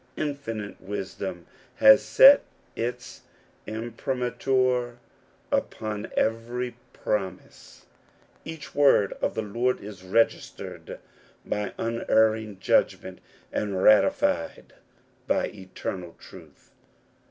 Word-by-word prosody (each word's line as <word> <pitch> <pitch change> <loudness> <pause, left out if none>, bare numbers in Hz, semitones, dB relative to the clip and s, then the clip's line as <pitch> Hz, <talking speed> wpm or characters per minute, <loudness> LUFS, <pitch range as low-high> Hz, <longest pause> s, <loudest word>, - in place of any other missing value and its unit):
Infinite 115 -9 -5
wisdom 95 -2 -5 0.3
h^^ 110 0 +8
set 270 - +7 0.3
its 120 +2 -5 0.5
imprimatur 125 +2 -1 0.5
upon 105 -1 -3
every 120 +2 -1 0.2
promise; 95 -3 -5 0.6
each 160 -2 -9
wor*''^^ 135 -9 +4
of - - -1
the 110 - -2
Lord 120 +5 -1
is 100 -2 -10
registered 95 +5 -1 0.5
by 105 -1 -3
unerring 110 -2 +1
judgmen^^ - - 0 0.3
and 100 -3 -2
ratified 85 -5 +2 0.5
by - - +1
eternal 95 -3 -7
truth. - - -16
110 Hz, 85 wpm, -26 LUFS, 100-125 Hz, 0.6 s, h^^